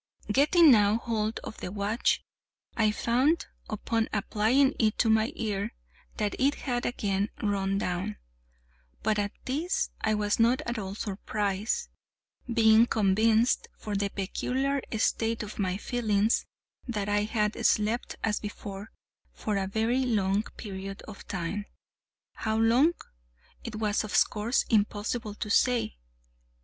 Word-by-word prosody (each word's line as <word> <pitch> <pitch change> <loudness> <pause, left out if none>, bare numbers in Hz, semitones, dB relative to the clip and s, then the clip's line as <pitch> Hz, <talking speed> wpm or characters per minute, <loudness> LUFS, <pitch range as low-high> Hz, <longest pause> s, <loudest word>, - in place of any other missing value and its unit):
Getting 300 +6 +6
now 210 -2 +5
hold 225 -2 -2
of - - -8
the 180 - -5
watch, 210 +4 0 0.5
I 220 -2 +3
found, 255 +9 +1 0.2
upon 225 +1 -1
applying 225 +6 +2
it 215 -2 +2
to 225 - +3
my 220 +4 +3
ear, 210 0 -3 0.4
that 210 -2 -1
it 280 +2 +3
had 245 -3 -2
again 200 -3 -1
run 195 -1 0
down; 190 +2 -2 0.9
but 215 -1 +1
at 205 0 -1
this 350 - -1
I 215 0 +2
was 210 +1 0
not 235 +3 +4
at 235 -1 -2
all 195 -1 -5
surprised, 205 - -2 0.6
being 225 0 +6
convinced, 220 +3 +3
from 210 - -5
the 200 0 0
peculiar 265 +8 -1 0.2
state 225 +1 0
of 210 0 -8
my 185 -2 0
feelings, 215 -1 +1 0.4
that 210 -4 -2
I 205 0 +1
had 215 -1 -1
slept, 215 +3 +1
as 210 -1 +1
before, 205 0 -7 0.4
for 210 - -3
a 195 -1 0
very 225 +6 +1
long 205 -5 +1 0.2
period 195 -1 -7
of 210 - -11
time, 195 +2 -3 0.7
how 220 0 -2
long, 240 +9 +4 0.7
it 230 - -6
was 215 -1 0
of 210 - -1
course 215 +4 0
impossible 210 0 0
to 210 - -4
say. 235 - +2
215 Hz, 135 wpm, -28 LUFS, 205-235 Hz, 0.9 s, Getting